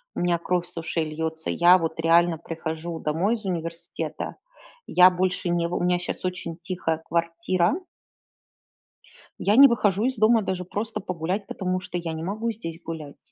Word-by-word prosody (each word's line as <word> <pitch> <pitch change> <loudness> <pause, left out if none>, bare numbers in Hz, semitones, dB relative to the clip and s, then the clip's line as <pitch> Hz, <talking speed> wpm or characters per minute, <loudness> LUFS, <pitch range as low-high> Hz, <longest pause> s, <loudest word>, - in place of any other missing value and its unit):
у - - -2
меня 175 -1 +2
кровь 175 +1 -1
с 180 - -15
ушей 165 0 -1
льется. 160 +1 -4
Я 175 +2 +6
вот 165 -1 -3
реально 165 0 +4
прихожу 160 +1 -5
домой 175 +10 +1
из 215 -3 -9
университета, 170 -2 -4 0.5
я 180 +1 +7
больше 180 0 -1
не 170 -1 +1
вы 175 - -2
у - - -2
меня 180 0 +2
сейчас 180 - -5
очень 180 -2 -4
тихая 170 -3 -2
квартира. 170 +3 0 1.7
Я 205 +2 +3
не 280 0 +11
выхожу 210 -2 +1
из 260 0 0
дома 220 0 +4
даже 185 -1 -2
просто 210 +4 -4
погулять, 180 +3 -3
потому 185 -2 -2
что 180 -1 -5
я 165 -2 -3
не 160 0 -5
могу 215 +5 -2
здесь 165 -6 -8
гулять. 155 -4 -7
175 Hz, 170 wpm, -25 LUFS, 165-185 Hz, 1.7 s, не